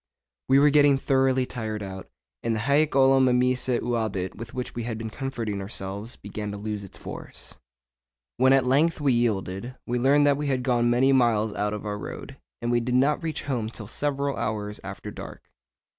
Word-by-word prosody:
We 135 - +6
were 145 +1 +6
getting 145 -1 +5
thoroughly 130 -1 +2
tired 110 -4 -4
out, 95 -1 -8 0.3
and 115 -1 0
the 110 - -2
hæc 140 +4 +2
olim 135 -1 +5
meminisse 125 0 +2
juvabit 110 -6 -2
with 115 +2 -8
which 125 -1 -5
we 120 - -4
had 115 -1 -4
been 110 0 -5
comforting 115 -6 -4
ourselves 100 +3 -5
began 105 +1 -6
to 100 - -5
lose 105 0 -4
its 95 - -11
force. - - -7 0.8
When 130 +1 +5
at 135 -1 +4
length 150 +6 +3
we 140 -3 +2
yielded, 115 0 -1
we 120 +1 -1
learned 140 +3 +4
that 140 -1 +4
we 150 0 -2
had 130 -2 0
gone 120 -2 +2
many 130 +3 +4
miles 110 -4 +3
out 105 +1 -1
of 105 - -7
our 105 0 -3
road, 90 - -8 0.3
and 120 - 0
we 120 - +3
did 125 +1 -1
not 140 +4 +3
reach 160 -2 -3
home 120 -6 -2
till 115 -1 -8
several 140 +4 -1
hours 105 -1 -3
after - - -7
dark. - - -10
120 Hz, 195 wpm, -26 LUFS, 110-135 Hz, 0.8 s, We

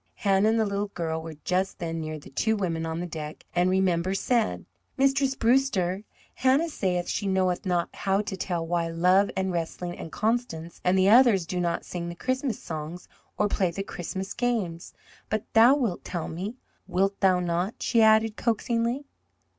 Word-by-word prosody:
Hannah 195 - +3
and 225 +1 +2
the 220 - +3
little 200 0 -1
girl 160 -4 -3
were 160 -1 -8
just 185 +1 0
then 165 -2 -3
near 155 0 -4
the 145 - -13
two 220 +11 +1
women 165 -5 -2
on 160 0 -3
the 175 - -3
deck, 155 -3 -7
and 180 +1 +3
Remember 185 -1 +1
said: 230 +2 0 0.3
"Mistress 270 0 +2
Brewster, 225 -7 +2 0.3
Hannah 270 +6 +2
sayeth 180 - -1
she 200 - -2
knoweth 190 0 0
not 175 -2 0
how 195 0 +1
to 205 -2 -5
tell 175 -3 -2
why 170 0 0
Love 180 +4 +3
and 190 0 0
Wrestling 175 +1 -3
and 165 - -7
Constance 215 -7 -2
and 180 +1 +3
the 190 +1 +4
others 225 -6 +6
do 180 +2 -3
not 170 -1 -1
sing 170 -1 -5
the 170 - -6
Christmas 255 +2 -2
songs 160 +2 -6 0.3
or 210 - +2
play 190 -2 +1
the 195 +4 -4
Christmas 190 +1 -5
games. 215 -9 -2 0.3
But 215 +1 -1
thou 235 +4 +7
wilt 235 -11 -1
tell 175 -3 -4
me 190 +8 -5 0.3
wilt 195 +1 0
thou 185 -2 +4
not?" 175 +4 -1
she 230 -1 +2
added 220 0 +5
coaxingly. 235 +4 0
190 Hz, 180 wpm, -26 LUFS, 170-220 Hz, 0.3 s, thou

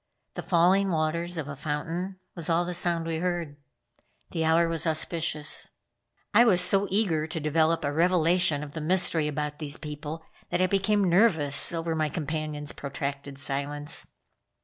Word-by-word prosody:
The - - -5
falling 190 +3 +3
waters 170 +1 -1
of 155 -3 -4
a 140 - -6
fountain 165 +6 -4
was 170 -3 -6
all 170 +1 +2
the 180 - -3
sound 170 -1 +1
we 165 -1 -2
heard. 170 -3 -2 0.8
The 165 - -1
hour 165 +1 +3
was 165 0 -1
auspicious. 155 -1 +1 0.6
I 220 +3 +7
was 200 -7 +4
so 195 +2 +3
eager 180 -6 0
to 160 - -4
develop 160 +2 +1
a 145 - -1
revelation 170 -2 +3
of 145 - -8
the 160 - -6
mystery 165 -2 +2
about 150 0 -4
these 150 -1 -4
people 150 +1 -7 0.2
that - - -1
I 185 - +4
became 200 +2 +1
nervous 170 -6 +4
over 165 -1 -2
my 155 -1 0
companion's 155 -1 -4
protracted 140 0 -5
silence. 145 +1 -2
160 Hz, 160 wpm, -27 LUFS, 150-175 Hz, 0.8 s, I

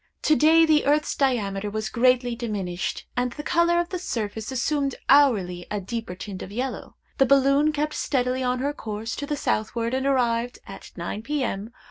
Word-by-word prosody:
To 310 - +4
day 320 +2 +6
the 305 -3 +3
earth's 295 +1 +2
diameter 210 -7 0
was 215 +1 -3
greatly 245 0 +2
diminished, 200 -7 -3
and 245 0 -1
the 295 - -7
color 340 +2 +3
of 345 0 -1
the 365 - -3
surface 220 - -4
assumed 275 +2 0
hourly 205 -11 +4
a 210 - -2
deeper 225 0 -5
tint 190 0 -7
of 190 - -8
yellow. 250 +4 -4 0.2
The 270 - +5
balloon 275 +2 +4
kept 300 0 -2
steadily 255 -1 0
on 250 0 0
her 280 +3 -1
course 220 -2 -5
to 285 - -4
the 295 - -2
southward, 230 0 -1
and 265 +1 0
arrived, 245 -2 +1
at 195 - -10
nine 175 +5 -4
P.M. 230 -5 -3
250 Hz, 180 wpm, -24 LUFS, 215-285 Hz, 0.2 s, day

